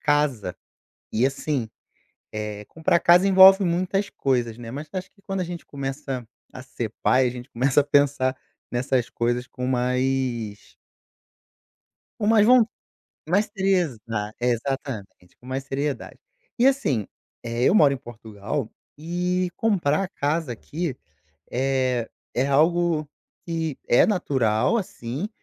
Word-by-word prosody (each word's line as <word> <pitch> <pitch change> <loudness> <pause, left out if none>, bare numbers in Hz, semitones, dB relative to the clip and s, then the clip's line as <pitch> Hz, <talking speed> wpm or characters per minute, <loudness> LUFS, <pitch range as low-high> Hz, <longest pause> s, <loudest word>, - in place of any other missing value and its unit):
casa. 145 -11 +1 0.6
E 115 +4 +3
assim, 135 -4 -2 0.6
eh, 105 -1 -5
comprar 160 +5 +1
casa 180 +3 +5
envolve 190 +1 +8
muitas 185 +3 0
coisas, 120 -4 -1
né, 115 -1 -8
mas 145 +3 -6
acho 185 -1 -5
que 200 - -28
quando 195 0 -3
a - - 0
gente 175 0 -7
começa 135 -3 -5 0.3
a 130 - -9
ser 120 -4 -5
pai, 130 -1 +4
a - - -2
gente 125 +1 -9
começa 130 +4 +3
a - - -11
pensar 140 -2 +2 0.4
nessas 120 -1 0
coisas 120 +1 -1
com 125 0 -7
mais 125 -4 -1 1.5
com 210 - 0
mais 215 -1 +5
von 250 -2 +7 0.6
mais 200 +5 +3
série 195 0 +2
Exa 165 -11 0 0.4
é, 125 - +1
exatamente, 115 -7 -4
com 125 - -16
mais 130 +1 -3
seriedade. 140 -1 -3 0.4
E, 245 - +5
assim, 145 - +2 0.4
eh, 115 +1 -1
eu - - +4
moro 145 -9 +6
em - - -4
Portugal, 115 +1 -5 0.3
e 180 +3 -1
comprar 190 -5 +1
casa 155 -6 -1
aqui 150 +4 -4 0.6
é 130 -2 0 0.3
é 130 +3 +2
algo 160 +1 +2 0.4
que 165 -4 -3
é 120 - +6
natural, 135 - +1
assim, 160 - -4
135 Hz, 135 wpm, -24 LUFS, 120-175 Hz, 1.5 s, envolve